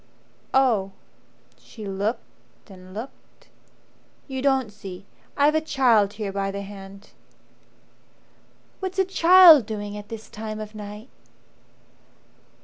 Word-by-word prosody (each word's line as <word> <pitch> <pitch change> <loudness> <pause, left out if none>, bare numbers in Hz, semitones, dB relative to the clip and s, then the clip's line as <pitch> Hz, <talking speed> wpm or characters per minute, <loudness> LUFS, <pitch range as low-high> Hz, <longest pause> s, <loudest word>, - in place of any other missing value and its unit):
"Oh." 220 -8 +2 0.7
She 215 - -11
looked 200 +2 -6
and 185 -1 -14
looked. 220 +7 -11 0.8
"You 265 -2 -5
don't 265 -5 +1
see 195 -2 -10 0.3
I've 290 +1 +4
a 315 - +1
child 240 -9 +2
here 205 -2 -5
by 195 0 -2
the 200 0 -5
hand." 195 0 -12 1.7
"What's 380 0 -5
a 380 - +3
child 345 - +7
doing 205 -1 -5
at 205 0 -9
this 225 -1 -8
time 215 0 -7
of 215 0 -8
night 210 +3 -9
215 Hz, 115 wpm, -24 LUFS, 200-265 Hz, 1.7 s, child